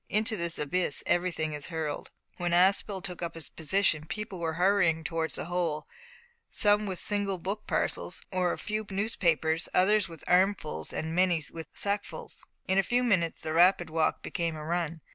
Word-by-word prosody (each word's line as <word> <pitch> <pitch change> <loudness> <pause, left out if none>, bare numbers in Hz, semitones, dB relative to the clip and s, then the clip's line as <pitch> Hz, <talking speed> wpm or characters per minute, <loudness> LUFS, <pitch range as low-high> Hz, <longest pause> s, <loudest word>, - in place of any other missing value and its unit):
Into 215 +1 +1
this 170 -3 0
abyss 150 +1 -1
everything 170 -3 0
is 150 -1 -3
hurled. 160 -3 -4 0.3
When 175 -1 -1
Aspel 190 +1 +3
took 180 -3 -5
up 170 -1 -4
his 165 - -6
position 160 -2 +2
people 210 -2 -5
were 165 -1 -1
hurrying 175 -3 +3
towards 165 0 -2
the - - -3
hole, 170 -3 -1 0.6
some 210 0 +4
with 190 -2 -3
single 200 -1 0
book 195 +5 -5
parcels, - - -1
or 180 -2 +1
a - - -3
few 215 0 -3
newspapers, 170 -6 +1
others 205 +1 +4
with 165 -2 -11
armfuls, 185 -3 +1
and 160 0 -3
many 175 -2 +2
with 160 -1 -7
sackfuls. 205 0 -3 0.2
In 190 +1 +3
a - - +7
few 245 +6 +1
minutes 185 -9 +1
the 155 - -3
rapid 175 -1 +4
walk 160 -1 0
became 165 -2 -2
a 155 -1 -7
run. 165 -1 -2
175 Hz, 175 wpm, -29 LUFS, 160-195 Hz, 0.6 s, a